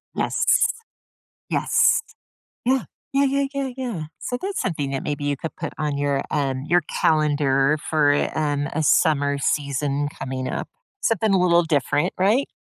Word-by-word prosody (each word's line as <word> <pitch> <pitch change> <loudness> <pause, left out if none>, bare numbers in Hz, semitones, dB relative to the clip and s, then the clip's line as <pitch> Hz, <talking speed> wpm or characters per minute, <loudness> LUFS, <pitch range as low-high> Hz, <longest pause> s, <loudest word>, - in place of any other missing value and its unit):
Yes. - - -1 1.1
Yes. - - +3 0.6
Yeah. 260 -1 +2 0.3
Yeah, 275 +1 +3
yeah, 275 +1 +1
yeah, 275 -1 -2
yeah. 235 -11 -3 0.2
So 245 - -3
that's 390 +1 -3
something 150 -6 -2
that 135 - -3
maybe 145 -1 -3
you 145 -1 0
could 165 - -6
put - - -5
on 150 -2 -1
your, 140 -1 0
um, 135 -2 -1
your 175 +1 +4
calendar 145 -2 +2
for, 150 -2 +3 0.3
um, 145 -2 0
a 160 - 0
summer 145 -3 +3
season 140 0 -1
coming 130 -2 -5
up. - - -4 0.3
Something 220 -2 +1
a 190 - +4
little 175 -1 +4
different. 145 -2 0
Right? 215 +9 +3
150 Hz, 150 wpm, -23 LUFS, 140-205 Hz, 1.1 s, your